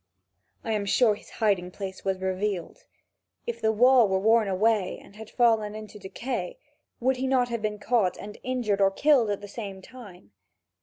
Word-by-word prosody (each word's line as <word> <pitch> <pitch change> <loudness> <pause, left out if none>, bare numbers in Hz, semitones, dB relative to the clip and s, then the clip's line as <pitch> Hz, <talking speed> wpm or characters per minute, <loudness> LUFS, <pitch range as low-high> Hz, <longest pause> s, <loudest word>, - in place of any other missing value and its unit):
I 225 - -3
am 210 -2 -1
sure 225 +1 +4
his 205 - -12
hiding 195 -5 0
place 190 0 -7
was 190 -1 -1
revealed. 190 -1 -3 0.6
If 475 -1 -5
the 220 - +3
wall 245 +1 +5
were 190 -1 +1
worn 220 +2 +3
away 195 0 +1
and 200 - -17
had 220 0 -10
fallen 225 -4 +2
into 215 -1 -9
decay, 245 - -5 0.4
would 260 +2 +1
he 260 +1 -2
not 255 -2 +2
have 235 -2 -3
been 210 -1 -2
caught 210 -4 +1
and 210 +1 -9
injured 240 -6 -1
or 195 - +5
killed 255 +2 +3
at 205 -1 -2
the 205 - -8
same 200 -3 -7
time? 190 - -14
215 Hz, 185 wpm, -26 LUFS, 195-240 Hz, 0.6 s, wall